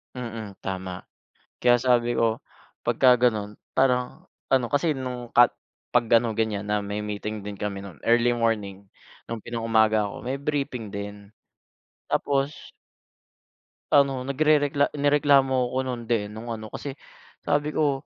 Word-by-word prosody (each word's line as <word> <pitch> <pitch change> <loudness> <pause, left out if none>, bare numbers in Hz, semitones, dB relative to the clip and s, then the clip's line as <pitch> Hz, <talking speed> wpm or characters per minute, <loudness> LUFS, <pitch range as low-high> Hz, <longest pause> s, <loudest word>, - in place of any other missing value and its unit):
Mm, 115 -5 -7
tama. 95 -1 -5 0.5
Kaya 120 0 +5
sabi 120 -2 +3
ko, 115 -1 +1 0.5
'pagka 125 -1 +5
gano'n 105 -4 0 0.2
parang 125 -2 +1 0.2
ano, 130 -2 +4
kasi, 150 +2 +1
nung 125 -2 -5
ka 120 0 +7 0.4
'pag 120 -1 +3
gano'ng 115 -1 +3
ganyan 105 -2 -1
na 105 0 +1
may 105 +1 -3
meeting 105 0 -4
din 100 0 -7
kami 100 -1 -4
no'n, 95 -6 -10
early 120 +1 +4
morning 105 -4 -1 0.4
nung 115 -2 -5
pinang-umaga 110 -2 +2
ako, 100 - -6
may 130 +2 -2
briefing 135 -7 -3
din. 100 0 -7 0.8
Tapos 140 +1 -1 1.2
ano 140 -2 +4
nagrerekla 145 0 +3
nireklamo 140 -2 +3 0.2
'ko 130 - -2
nun, 125 -2 -4
de, 110 -3 0
nung 115 +2 -6
ano 110 -1 -7
kasi, 140 +4 -6 0.5
sabi 145 +1 0
ko 145 -3 0
120 Hz, 135 wpm, -25 LUFS, 105-135 Hz, 1.2 s, ka